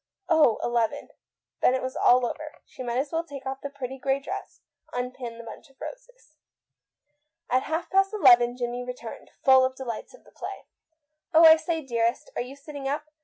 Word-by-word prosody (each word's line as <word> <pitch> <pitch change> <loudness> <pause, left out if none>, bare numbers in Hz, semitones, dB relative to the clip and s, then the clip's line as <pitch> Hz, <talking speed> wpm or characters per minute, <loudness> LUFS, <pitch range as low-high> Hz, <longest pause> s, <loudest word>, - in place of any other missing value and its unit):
Oh, 310 -9 +4
eleven! 235 -2 0 0.5
Then 255 - +4
it 260 - -2
was 260 0 -4
all 250 0 +4
over. 305 +5 -5
She - - -12
might 240 -1 -2
as 275 +2 -1
well 330 0 0
take 285 -5 -10
of 265 0 -3
the 280 - -5
pretty 265 -1 -7
grey 270 +1 +1
dress, 275 - -7 0.3
unpin 245 -1 -5
the 235 - -9
bunch 230 +5 -11
of 270 - -27
roses. - - -11 1.1
At 255 +1 +4
half 320 +2 -1
past 390 +1 +3
eleven 245 - +5
Jimmie 245 0 -3
returned, 245 -2 -8
full 265 -1 +7
of 260 0 0
the 265 - -7
delights 235 - -6
of - - -21
the - - -20
play. - - -8 0.7
"Oh, 330 +1 +9
I 320 0 +10
say, 320 0 -3
dearest, 235 - -1
are - - -1
you 250 +3 -7
sitting 280 -1 -7
up? 300 +2 -3
265 Hz, 195 wpm, -26 LUFS, 245-310 Hz, 1.1 s, I